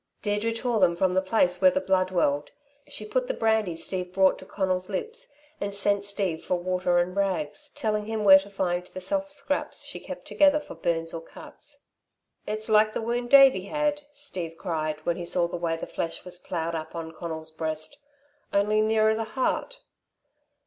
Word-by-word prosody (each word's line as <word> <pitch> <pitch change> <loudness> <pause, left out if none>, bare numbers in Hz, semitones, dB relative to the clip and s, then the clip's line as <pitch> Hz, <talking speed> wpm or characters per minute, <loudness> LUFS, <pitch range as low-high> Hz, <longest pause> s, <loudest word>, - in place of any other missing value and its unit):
Deirdre 210 +2 0
tore 230 0 -1
them 175 -3 +4
from 185 +1 +1
the 185 - +3
place 185 -2 +1
where 185 - +8
the 185 - 0
blood 185 -1 +1
welled. 145 -5 0 0.4
She 215 - -6
put 250 +4 -1
the - - -2
brandy 220 -6 +1
Steve 180 +2 -2
brought 190 0 +4
to 190 - -12
Conal's 185 -1 -1
lips, 460 - -3 0.3
and 200 0 -3
sent 200 0 +1
Steve 195 -5 -1
for 180 - 0
water 180 0 0
and 175 +1 +1
rags, 185 -7 -1
telling 210 -1 -1
him 220 -1 -2
where 190 -1 +9
to 195 +1 -10
find 180 -2 -1
the 185 - -8
soft 290 +9 -1
scraps 285 0 -2
she - - -5
kept - - -8
together 295 0 +4
for 295 - -10
burns 165 0 -2
or 165 - -5
cuts. 295 - -12 0.6
"It's 215 +1 -2
like 215 0 +4
the - - -2
wound 240 +1 -2
Davey 270 -8 +7
had," 295 +4 0
Steve 185 - -4
cried, 155 -4 -3
when 170 - 0
he 175 - -5
saw 170 0 +2
the 170 - -6
way 170 -1 -1
the - - -5
flesh 165 - -4
was 180 -1 -5
ploughed 170 -2 -3
up 160 0 -5
on 165 -1 -5
Conal's 160 -1 -6
breast, 155 -1 -4 0.5
"only 210 +2 +3
nearer 220 0 +3
the 225 +1 -1
heart." - - -1
190 Hz, 190 wpm, -26 LUFS, 175-220 Hz, 0.6 s, where